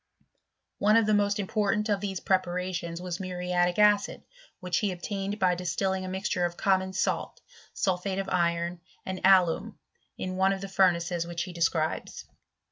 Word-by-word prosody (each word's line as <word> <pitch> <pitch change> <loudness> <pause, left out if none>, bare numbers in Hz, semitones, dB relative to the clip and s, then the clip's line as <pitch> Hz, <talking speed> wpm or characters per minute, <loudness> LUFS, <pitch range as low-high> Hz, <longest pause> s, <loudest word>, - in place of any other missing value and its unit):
One 215 +2 +5
of 225 - +4
the 215 - +2
most 205 0 +2
important 210 +1 0
of 205 -2 0
these 195 -3 -3
preparations 180 -2 -1
was 180 -1 -5
muriatic 180 -1 -1
acid, 210 -1 +3 0.4
which 180 -2 -1
he 205 -3 0
obtained 195 +3 -4
by 185 -3 +3
distilling 185 +2 -1
a - - -5
mixture 190 -1 -1
of 175 0 -2
common 190 -1 +1
salt, 190 - -2 0.3
sulphate 190 0 -1
of 195 0 -2
iron, 170 -1 0 0.3
and 190 0 -4
alum, 190 +2 +3 0.4
in 185 0 -4
one 190 +1 +3
of 195 - -5
the 195 - -5
furnaces 175 -3 +2
which 170 0 -3
he 185 - -8
describes. 165 -2 -1
185 Hz, 160 wpm, -28 LUFS, 175-195 Hz, 0.4 s, One